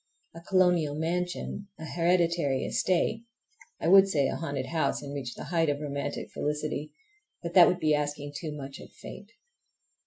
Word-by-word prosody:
A 165 - -10
colonial 175 -5 +2
mansion, 175 +4 -3
a 160 - -7
hereditary 170 -4 +1
estate, 185 +5 0 0.6
I - - -2
would 195 +2 +8
say 145 -8 +2
a - - -2
haunted 140 -5 -3
house, 160 0 -1
and 140 0 -6
reach 130 -4 -5
the - - -7
height 165 -2 +3
of 145 0 -1
romantic 140 -1 -4
felicity—but 155 - -5
that 175 -1 +9
would 180 - +1
be 155 -2 +2
asking 145 -1 -2
too 155 -1 -4
much 140 -2 -8
of - - -12
fate! 205 - -11
160 Hz, 160 wpm, -28 LUFS, 145-180 Hz, 0.6 s, that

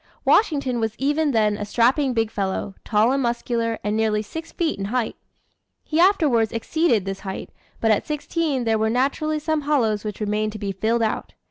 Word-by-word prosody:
Washington 280 - +3
was 220 -1 -1
even 295 +3 +1
then 215 -5 +2
a 210 - -4
strapping 250 +5 +2
big 225 -1 +1
fellow, 195 0 -2
tall 220 +2 +3
and 275 +1 +1
muscular, 235 -2 -1
and 210 0 -1
nearly 215 -1 +1
six 325 +9 -8
feet 325 - -1
in 195 - -2
height. 235 +2 -1 0.7
He 310 - -1
afterwards 305 - +4
exceeded 230 - +1
this 195 0 -4
height, 190 -1 -6 0.3
but 225 - +2
at 210 - +1
sixteen 300 -2 -1
there 225 -1 +1
were 220 0 +2
naturally 280 +6 0
some 310 0 -1
hollows 240 -8 +1
which 210 -2 -5
remained 210 0 -1
to - - -6
be 200 -1 -3
filled 225 +5 0
out. 220 - -2
230 Hz, 190 wpm, -23 LUFS, 215-290 Hz, 0.7 s, afterwards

